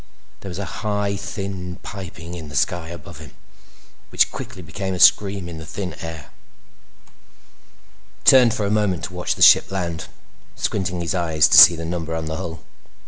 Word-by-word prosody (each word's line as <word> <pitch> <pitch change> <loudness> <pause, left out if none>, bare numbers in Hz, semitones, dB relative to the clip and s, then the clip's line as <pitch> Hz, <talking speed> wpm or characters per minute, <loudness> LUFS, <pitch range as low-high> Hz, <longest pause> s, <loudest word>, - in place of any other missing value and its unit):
There 95 - -9
was 90 - -7
a 100 -2 -6
high, 105 -1 -1
thin 95 -3 -6
piping 90 -4 -9
in 80 -4 -8
the 75 - -10
sky 85 +2 -1
above 85 -1 -10
him 75 -4 -13 0.7
which - - +2
quickly 90 - -8
became 95 +3 -5
a - - -6
scream 100 -2 +4
in 85 -2 -8
the 80 - -9
thin 90 +1 -5
air. 80 -4 -8 1.9
He - - -34
turned 125 -4 +6
for 105 - -2
a 100 - -1
moment 105 -5 0
to 95 - -6
watch 90 0 -2
the - - +2
ship - - +7
land, 85 -4 -4 0.5
squinting 90 -3 -2
his 85 - -2
eyes 80 -4 +2
to - - +5
see 85 - +10
the 80 0 -6
number 80 -1 -4
on 80 -1 -4
the 80 0 -4
hull. 80 -1 -7
90 Hz, 185 wpm, -21 LUFS, 80-100 Hz, 1.9 s, see